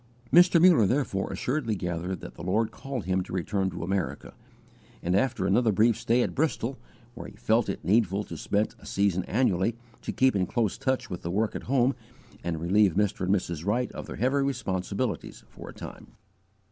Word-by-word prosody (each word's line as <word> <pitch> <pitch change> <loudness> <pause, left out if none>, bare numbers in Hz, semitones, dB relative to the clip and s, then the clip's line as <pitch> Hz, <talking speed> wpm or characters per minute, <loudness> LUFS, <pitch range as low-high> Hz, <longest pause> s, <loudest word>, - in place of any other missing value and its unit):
Mr. 175 0 +7
Muller 165 - +6
therefore 120 -7 -1
assuredly 125 -5 -1
gathered 90 0 -3
that - - -9
the - - -11
Lord 110 +5 0
called 135 -2 -5
him 95 0 +1
to 90 - -9
return 95 +1 -1
to 85 - -6
America, 90 -7 -3 0.7
after 100 +4 +1
another 110 +4 +3
brief 110 +3 +4
stay 120 +4 +2
at - - -3
Bristol, 135 -4 -1 0.3
where 120 - -8
he - - -12
felt 110 -1 +1
it 95 - -4
needful 100 -1 +2
to 85 - -8
spend 100 +7 -1
a - - -16
season 100 -3 +1
annually, 110 -2 +1 0.3
to - - -4
keep 130 -2 +3
in 95 -2 +1
close 110 -3 0
touch 130 -2 -1
with 90 - -5
the 85 - -4
work 105 +5 0
at - - -3
home 130 0 +3 0.5
and 85 -2 -2
relieve 95 +2 +3
Mr. 100 -2 0
and 95 - +4
Mrs. 85 -4 -3
Wright 120 +6 0
of - - -8
their - - -6
heavy 130 +3 +1
responsibilities, 105 -5 -2
for - - -11
a - - -9
time. - - -9
105 Hz, 190 wpm, -27 LUFS, 95-125 Hz, 0.7 s, Mr